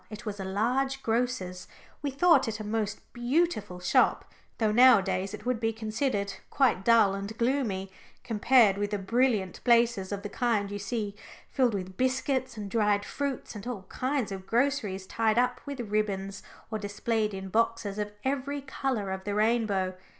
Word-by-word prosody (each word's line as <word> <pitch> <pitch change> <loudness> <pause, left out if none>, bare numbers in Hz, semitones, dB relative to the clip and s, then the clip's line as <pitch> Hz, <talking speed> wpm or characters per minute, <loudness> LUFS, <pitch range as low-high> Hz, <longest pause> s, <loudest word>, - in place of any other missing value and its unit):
It 215 +2 -9
was 205 -2 -4
a - - -3
large 255 +8 0
grocer's. 225 -6 -1 0.3
We 285 - -1
thought 280 0 +4
it 220 0 -3
a - - -4
most 210 -1 -2
beautiful 240 - 0
shop, 180 - +2 0.3
though 220 -2 +2
nowadays 195 -6 +5
it - - -13
would 250 -2 0
be 225 -1 +1
considered 220 -2 -2 0.2
quite 255 -9 +2
dull 225 -3 +5
and 200 +3 -5
gloomy, 235 -7 0 0.3
compared 225 -2 +4
with 205 0 -1
the 205 - -1
brilliant 210 -1 0
places 235 -5 +3
of 200 0 -4
the - - -3
kind 215 -5 0
you 205 - -4
see 205 0 -3 0.4
filled 250 -5 +2
with 185 -1 -5
biscuits 260 -1 0
and 205 -2 -6
dried 210 -2 +2
fruits 280 -2 -4
and 210 +1 -8
all 230 -6 -4
kinds 260 -4 -1
of 190 -1 -7
groceries 230 -7 0
tied 220 +2 +1
up 250 0 +1
with 280 -2 -5
ribbons, 200 -3 -2 0.3
or 220 - -2
displayed 215 +1 -1
in 190 0 -6
boxes 220 -1 0
of 210 0 -2
every 280 +1 -1
colour 265 -7 -2
of 190 0 -4
the 205 0 -3
rainbow. 210 -4 +1
220 Hz, 170 wpm, -28 LUFS, 200-250 Hz, 0.4 s, nowadays